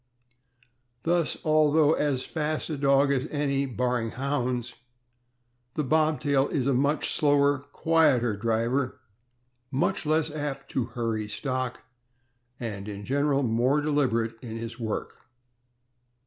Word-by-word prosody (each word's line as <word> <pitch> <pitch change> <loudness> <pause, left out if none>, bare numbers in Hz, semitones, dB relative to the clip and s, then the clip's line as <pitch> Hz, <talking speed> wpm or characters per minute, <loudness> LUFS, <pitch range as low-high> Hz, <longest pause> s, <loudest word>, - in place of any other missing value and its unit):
Thus, 170 -1 +1
although 155 0 +4
as 140 -5 0
fast 155 0 -2
a - - -1
dog 140 0 +3
as 135 +2 -1
any, 140 -2 0
barring 125 -1 -1
Hounds, 125 -2 -2 1.0
the 150 - 0
Bobtail 150 -1 +2
is 135 -5 -1
a 140 - +2
much 140 +4 +1
slower, 145 -1 +3
quieter 145 -9 +3
driver, 115 +5 0 0.7
much 135 0 0
less 155 0 +1
apt 145 -2 -4
to 130 - 0
hurry 115 -3 -3
stock, 130 +3 -3 0.8
and 105 -4 -5
in 100 -1 -6
general 140 +2 +1
more 125 +5 +2
deliberate 125 -7 0
in 115 -2 -6
his 115 +1 -6
work. 110 -2 -4
135 Hz, 120 wpm, -27 LUFS, 120-150 Hz, 1.0 s, although